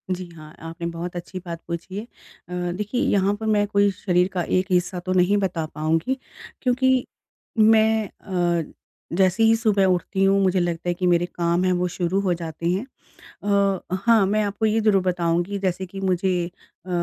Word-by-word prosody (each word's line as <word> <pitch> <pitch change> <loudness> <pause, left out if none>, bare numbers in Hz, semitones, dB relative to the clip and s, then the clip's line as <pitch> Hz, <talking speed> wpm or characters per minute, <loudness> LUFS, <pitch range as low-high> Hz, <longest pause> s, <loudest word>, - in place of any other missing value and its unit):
जी, 185 - -7
हाँ। 155 -1 -12 0.2
आपने 170 +1 -5
बहुत 175 +1 -6
अच्छी 175 +2 -6
बात 170 -1 -6
पूछी 170 +2 -5
है। 210 - -3
अ, 180 -6 -7
देखिए 210 +5 -2
यहाँ 200 0 +2
पे 220 - -5
मैं 210 -1 +2
कोई 200 0 +3
शरीर 180 -2 +1
का 180 -2 0 0.2
एक 185 - -1
हिस्सा 180 0 +1
तो 185 +1 -3
नहीं 185 +3 +3
बता 180 -5 -1
पाऊँगी, 165 - 0 0.4
क्योंकि 260 0 +2 0.5
मैं 220 -1 +4
अ, 175 -4 -1 0.5
जैसे 190 +3 +3
ही 225 0 +6
सुबह 210 -4 +2
उठती 190 +1 +1
हूँ, 195 +1 +4
मुझे 185 0 +2
लगता 175 0 -2
है 175 - +2
कि 180 +1 -3
मेरे 175 0 +3
काम 170 0 0
है 185 - +2
वो 180 0 0
शुरू 180 +2 -1
हो 185 -3 +1
जाते 165 0 -6
हैं। 190 +8 -1 0.6
अ, 200 -3 +1
हाँ, 225 -4 +5
मैं 210 +2 +1
आपको 205 +2 -1
ये 220 +1 +2
ज़रूर 210 -3 +3
बताऊँगी 175 +2 0
जैसे 190 -1 -1
कि 195 +2 -9
मुझे 185 -1 +1 0.4
अ, - - -10
185 Hz, 185 wpm, -23 LUFS, 175-205 Hz, 0.6 s, ही